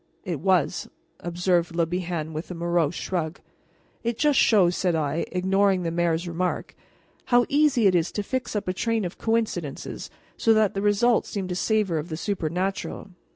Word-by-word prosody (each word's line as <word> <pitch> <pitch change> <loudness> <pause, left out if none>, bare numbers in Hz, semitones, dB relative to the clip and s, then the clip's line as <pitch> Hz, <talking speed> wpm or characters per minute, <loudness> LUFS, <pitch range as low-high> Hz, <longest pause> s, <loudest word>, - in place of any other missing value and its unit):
"It 175 -6 -3
was," 180 -2 +1 0.3
observed 175 0 0
Le 170 -1 +2
Bihan 170 -2 -3
with 155 +2 -5
a 180 - -5
morose 170 -2 0
shrug. 170 -2 -3 0.6
"It 235 -1 -1
just 295 0 +3
shows," 185 -6 +4
said 180 -3 +1
I, 155 +1 -1
ignoring 190 0 +2
the 165 - -1
mayor's 170 0 0
remark, 175 +2 -2 0.5
"how 245 -1 +4
easy 285 -5 +3
it 190 - +5
is 170 -1 +1
to 205 - -2
fix 250 +1 -3
up 210 -1 -2
a 185 - 0
train 225 +1 0
of 175 - -6
coincidences 220 -10 -2 0.3
so 225 -1 +4
that 215 -2 +3
the 195 - -2
result 210 +3 +3
seems 195 -3 -4
to 180 - -2
savor 195 -4 +1
of 155 +4 -6
the 155 - -4
supernatural. 190 +2 -3
185 Hz, 175 wpm, -25 LUFS, 170-210 Hz, 0.6 s, it